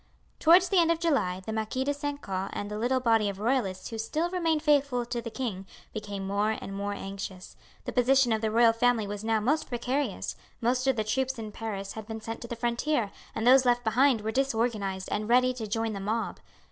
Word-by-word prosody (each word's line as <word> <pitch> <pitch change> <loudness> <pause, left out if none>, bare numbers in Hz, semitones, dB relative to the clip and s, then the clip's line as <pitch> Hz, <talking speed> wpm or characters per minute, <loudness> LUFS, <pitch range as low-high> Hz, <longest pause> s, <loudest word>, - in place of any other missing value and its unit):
Towards 355 +3 +6
the 385 - +4
end 335 -1 +4
of 335 -1 +2
July 190 - 0
the 220 - -3
Marquis 220 +4 -1
de 285 +2 0
St. 290 0 -4
Caux 190 -1 -3
and 205 0 -4
the 210 - -3
little 255 +3 +1
body 225 -4 +3
of 195 - -5
royalists 205 -5 -1
who 225 - -5
still 315 +10 -1
remained 325 -4 0
faithful 280 -5 +2
to 240 0 -3
the 230 - -5
king 215 -6 -4 0.3
became 205 -2 -5
more 205 +3 0
and 195 - -7
more 200 +1 -2
anxious; 195 -2 -7 0.3
the - - -3
position 250 -1 +4
of 220 - -1
the 220 - +1
royal 230 +1 +5
family 230 -1 +2
was 205 +1 -5
now 220 0 +2
most 290 +9 0
precarious; 255 +4 -2 0.2
most 255 +2 +1
of 265 - +3
the 215 - 0
troops 260 +4 -1
in 220 -2 -6
Paris 200 -3 -5
had 220 -1 -8
been 220 -1 -5
sent 225 +1 -6
to 235 - -6
the 235 - -4
frontier, 235 -1 0 0.2
and 220 - -2
those 260 +1 +7
left 245 -1 +2
behind 240 +1 +3
were 220 +1 -2
disorganized 225 -7 -1
and 210 +1 -2
ready 255 +1 +4
to 230 -4 -5
join 225 +1 -1
the 200 - -4
mob. 220 +4 -2
230 Hz, 225 wpm, -28 LUFS, 210-260 Hz, 0.3 s, those